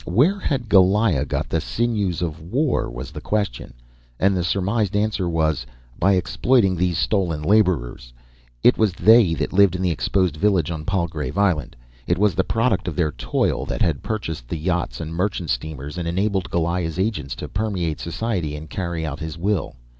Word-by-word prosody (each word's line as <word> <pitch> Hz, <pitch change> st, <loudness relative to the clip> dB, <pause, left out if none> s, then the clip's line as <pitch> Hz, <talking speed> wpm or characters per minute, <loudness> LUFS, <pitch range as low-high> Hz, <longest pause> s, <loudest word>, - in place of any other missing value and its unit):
Where 145 Hz, -, +3 dB
had 135 Hz, -9 st, -2 dB
Goliah 95 Hz, -, +4 dB
got -, -, -2 dB
the -, -, -1 dB
sinews 105 Hz, -7 st, -1 dB
of 80 Hz, -2 st, -4 dB
war? 125 Hz, -, 0 dB
was -, -, -7 dB
the 75 Hz, -1 st, -8 dB
question. 100 Hz, -, -2 dB, 0.4 s
And 95 Hz, +1 st, +3 dB
the 90 Hz, -, 0 dB
surmised 100 Hz, +3 st, 0 dB
answer 105 Hz, -3 st, 0 dB
was: 80 Hz, -5 st, 0 dB, 0.4 s
By 100 Hz, +3 st, +4 dB
exploiting 95 Hz, +2 st, +2 dB
these 90 Hz, -1 st, 0 dB
stolen 85 Hz, -8 st, 0 dB
labourers. 75 Hz, -, +1 dB, 0.5 s
It 125 Hz, -, +5 dB
was 110 Hz, -4 st, +3 dB
they 110 Hz, -2 st, +5 dB
that -, -, -3 dB
lived 100 Hz, -2 st, +5 dB
in 90 Hz, -, -2 dB
the 90 Hz, -, +2 dB
exposed 90 Hz, +1 st, 0 dB
village 90 Hz, -4 st, +2 dB
on 80 Hz, -2 st, -5 dB
Palgrave 85 Hz, -3 st, -2 dB
Island. 90 Hz, -9 st, +1 dB, 0.3 s
It -, -, +2 dB
was 105 Hz, -1 st, +3 dB
the 95 Hz, -, +1 dB
product 115 Hz, -3 st, 0 dB
of 85 Hz, -, -3 dB
their 80 Hz, -2 st, +1 dB
toil -, -, -1 dB
that -, -, -1 dB
had 80 Hz, -5 st, 0 dB
purchased 80 Hz, -, -4 dB
the 80 Hz, -, -3 dB
yachts 85 Hz, -6 st, -2 dB
and 80 Hz, 0 st, -5 dB
merchant 90 Hz, -3 st, -1 dB
steamers 75 Hz, +4 st, -4 dB
and 85 Hz, -, -3 dB
enabled 95 Hz, +2 st, 0 dB
Goliah's 85 Hz, -1 st, -1 dB
agents 95 Hz, -, -2 dB
to -, -, -6 dB
permeate 95 Hz, -7 st, -2 dB
society 85 Hz, -4 st, -2 dB
and 75 Hz, +1 st, -9 dB
carry 85 Hz, -3 st, -3 dB
out 75 Hz, -2 st, -5 dB
his 80 Hz, 0 st, -6 dB
will. 95 Hz, +1 st, -1 dB
90 Hz, 180 wpm, -22 LUFS, 80-100 Hz, 0.5 s, It